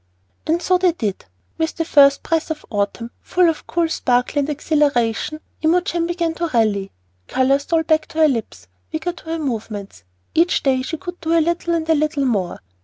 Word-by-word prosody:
And 335 +2 +1
so 365 -1 +3
they 360 -2 +3
did. 210 - -3 0.3
With 320 0 -1
the 330 - -1
first 280 -3 +5
breath 325 0 0
of 315 -1 -5
autumn, 210 +3 -2
full 360 -1 +2
of 325 -2 -2
cool 340 -1 +1
sparkle 250 -2 +1
and 285 +1 -1
exhilaration, 295 -3 0 0.2
Imogen 340 +1 +1
began 340 -1 -1
to 340 +1 -2
rally. 215 -7 +1 0.4
Color 260 +2 +2
stole 320 +3 0
back 315 -1 +1
to - - -11
her 310 - +7
lips, 230 - -3 0.3
vigor 345 +3 -2
to 345 - -15
her 325 +1 -3
movements; 215 - -5 0.3
each 340 +3 +2
day 265 -2 +2
she 320 +5 -4
could 355 +1 -8
do 335 0 +2
a - - +5
little 340 +1 0
and 320 -1 -2
a 325 - +4
little 295 -2 0
more. 200 -8 -1
310 Hz, 190 wpm, -20 LUFS, 255-335 Hz, 0.4 s, her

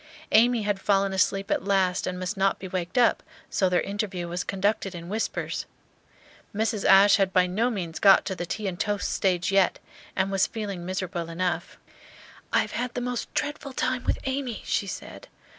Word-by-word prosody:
Amy 230 +1 +5
had 205 -1 -1
fallen 195 -1 +2
asleep 195 +1 +1
at - - +1
last 190 -2 +1
and 180 0 -3
must 185 +3 -3
not 195 0 +2
be 190 - -7
waked 180 +3 -4
up, 240 -2 +4 0.3
so 190 -3 +2
their 180 - +2
interview 195 -3 -3
was 175 +2 -3
conducted 195 -1 -1
in 170 0 -8
whispers. 220 +3 -3 0.9
Mrs. 220 -1 0
Ashe 195 +1 +7
had 195 -2 +1
by 185 -1 +4
no 210 +7 0
means 175 -8 -4
got 195 -1 +6
to 190 - -2
the 175 -1 -5
tea 215 +4 -4
and 180 -2 -4
toast 205 -1 -1
stage 180 -1 +1
yet, 195 -1 +3 0.4
and 190 0 0
was 195 -1 +2
feeling 200 -6 -5
miserable 180 -2 -3
enough. 175 +2 -2 0.7
"I - - +4
have - - -5
had 245 +1 -3
the 245 - -2
most 245 -1 -3
dreadful 290 -2 -3
time 255 -1 -1
with - - +1
Amy," 265 -4 -3
she 200 - 0
said. - - -8
195 Hz, 190 wpm, -26 LUFS, 185-220 Hz, 0.9 s, Ashe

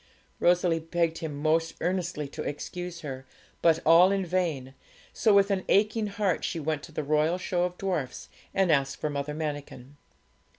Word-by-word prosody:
Rosalie 175 -1 +3
begged 165 0 -1
him 155 -4 -5
most 160 +2 +1
earnestly 175 -5 -2
to 155 - -7
excuse 175 +4 -5
her, 130 -3 -6 0.4
but 165 -2 +5
all 170 +4 +7
in 195 -1 0
vain; 165 -7 -1 0.4
so 220 - +3
with 200 0 +5
an 190 -1 0
aching 215 +2 +3
heart 200 -3 -1
she 165 - -2
went 155 -1 -2
to 165 - -11
the 155 - -3
Royal 155 +4 +2
Show 180 -1 0
of 180 0 -5
Dwarfs 170 -10 -3 0.2
and 190 -3 +2
asked 135 -2 +1
for 155 - -2
Mother 145 +1 -3
Manikin. 145 -3 -6
165 Hz, 170 wpm, -28 LUFS, 150-180 Hz, 0.4 s, all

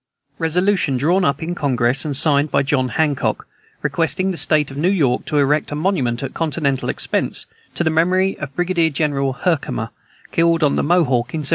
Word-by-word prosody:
Resolution 175 -3 +1
drawn 175 +8 +2
up 140 0 0
in 170 +2 -3
Congress, 130 -5 +1
and 145 -3 0
signed 145 0 +4
by 140 - +1
John 135 -3 0
Hancock, 150 -2 -1 0.4
requesting 185 +3 0
the - - -4
state 150 -3 +2
of 135 - -9
New 165 +5 +1
York 140 -11 +1
to 150 - -2
erect 145 +2 +1
a - - -3
monument, 150 -8 -1
at 135 - -5
continental 150 -4 -1
expense, - - -2 0.3
to - - 0
the 160 - +1
memory 185 +4 +2
of 140 -3 -7
Brigadier 175 -2 +1
General 140 -3 -1
Herkimer, 140 -7 -2 0.4
killed 165 -1 +2
on 145 - +3
the - - +1
Mohawk 145 -7 +1
in 155 - -2
1777. - - +3
150 Hz, 185 wpm, -19 LUFS, 135-170 Hz, 0.4 s, signed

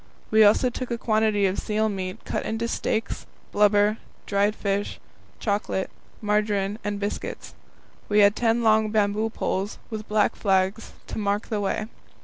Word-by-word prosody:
We 220 0 +7
also 215 +4 +4
took 255 +1 -5
a 235 - -1
quantity 215 -2 +2
of 190 0 0
seal 215 +1 0
meat 185 -3 -5
cut - - -2
into 225 +1 -2
steaks, 225 -1 -2 0.2
blubber, 205 +1 +4 0.3
dried 205 +1 +1
fish, 200 -1 -2 0.4
chocolate, 205 -2 -1 0.3
margarine, 210 -1 0
and 205 -1 -2
biscuits. 205 0 -5 0.6
We 210 0 +5
had 200 0 +5
ten 235 0 +1
long 220 -1 +4
bamboo 210 +1 +1
poles, 200 -2 -2
with 215 -1 -5
black 210 0 +2
flags, 195 +2 0
to - - -5
mark 205 +1 -1
the 215 -3 -1
way. 205 +2 -1
210 Hz, 150 wpm, -25 LUFS, 200-220 Hz, 0.6 s, We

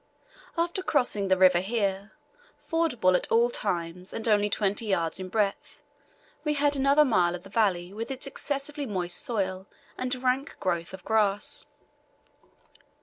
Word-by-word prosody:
After 345 +3 0
crossing 245 - +1
the 190 0 +3
river 185 -1 +6
here, 200 0 -2 0.4
fordable 270 - +1
at - - -1
all 235 +2 +4
times 180 -3 -3
and 225 - -3
only 210 -1 +3
twenty 205 +2 0
yards 170 -5 0
in 185 0 -6
breadth, 220 +9 -2 0.6
we 300 -1 0
had 290 0 +2
another 280 +2 +4
mile 180 -8 +2
of 175 - -9
the 195 - -12
valley 190 -4 +1
with 225 +4 -5
its 270 0 -2
excessively 280 +1 -4
moist 180 -4 -2
soil 190 -4 -2 0.3
and 255 +1 0
rank 260 +2 0
growth 170 -3 -1
of 190 - -16
grass. 210 -2 +1
210 Hz, 145 wpm, -27 LUFS, 185-265 Hz, 0.6 s, river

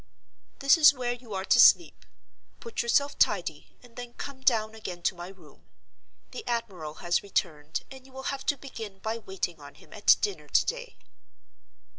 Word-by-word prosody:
"This 275 +4 +4
is 295 -2 +8
where 245 -1 -2
you 240 -4 -9
are 190 0 -3
to - - +4
sleep. - - +5 0.5
Put 465 - -4
yourself 280 +4 +1
tidy, 175 -7 0
and 240 -2 -18
then 245 -1 -9
come 275 -2 -8
down 220 -4 +2
again 185 -6 -8
to - - +1
my 175 0 -8
room. 185 -6 -17 0.6
The 455 - -7
admiral 190 -10 -3
has 175 0 +2
returned, 155 -6 -3
and 265 -1 -11
you - - -19
will 265 +1 -4
have 270 - -6
to 285 - +2
begin 225 -7 -8
by 220 +3 -4
waiting 190 -5 -4
on 145 0 -12
him - - -17
at - - +5
dinner 410 -2 -3
to - - +3
day." - - -5
230 Hz, 180 wpm, -28 LUFS, 185-265 Hz, 0.6 s, is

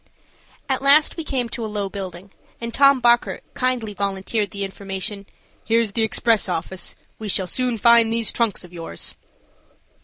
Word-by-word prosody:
At 265 -1 0
last 285 +3 +5
we 330 - -4
came 260 -5 -1
to 230 - -5
a 220 - -3
low 205 -1 -2
building, 190 -1 -7 0.3
and 235 0 -5
Tom 275 0 +5
Bockert 240 0 +3
kindly 250 -4 -1
volunteered 200 +1 -1
the 200 -1 -4
information: 195 +1 -5 0.4
"Here's 230 -2 +2
the 225 - -1
express 220 -1 +2
office. 180 +1 -3 0.2
We 220 - -5
shall 190 -1 +1
soon 250 +4 -1
find 235 +1 +6
those 230 -1 +1
trunks 230 -6 0
of 180 0 -14
yours." 165 - -5
220 Hz, 160 wpm, -22 LUFS, 195-240 Hz, 0.4 s, find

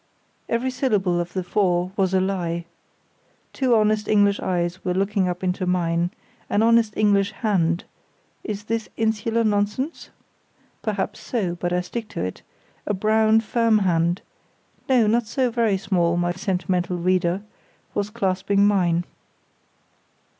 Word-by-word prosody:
Every 245 +3 0
syllable 205 -9 +1
of 175 0 -4
the 185 - -2
four 180 -1 +1
was 190 -3 +1
a - - +4
lie. 175 -3 -2 0.9
Two 255 -3 +2
honest 215 -1 +2
English 205 -1 +3
eyes 175 0 -2
were 180 -1 -1
looking 195 0 +1
up 180 +1 -4
into 185 0 -1
mine; 170 -1 +1 0.4
an 205 - +2
honest 230 -2 +3
English 200 -2 +3
hand—is 200 +1 -3
this 225 0 -3
insular 225 +1 +1
nonsense? 210 +8 -1 0.7
Perhaps - - -2
so, 205 -9 -2
but 175 0 -3
I 180 0 +1
stick 225 +5 -5
to - - -5
it—a 95 - -7
brown, 220 +2 +3
firm 230 0 +2
hand—no, 185 +6 -1
not 225 +1 +1
so 250 +2 0
very 225 -4 +1
small, 175 -4 +1
my 175 0 +1
sentimental 180 -1 -1
reader—was 185 +3 -2
clasping 200 -2 +1
mine. 175 -4 +2
195 Hz, 125 wpm, -23 LUFS, 180-220 Hz, 0.9 s, a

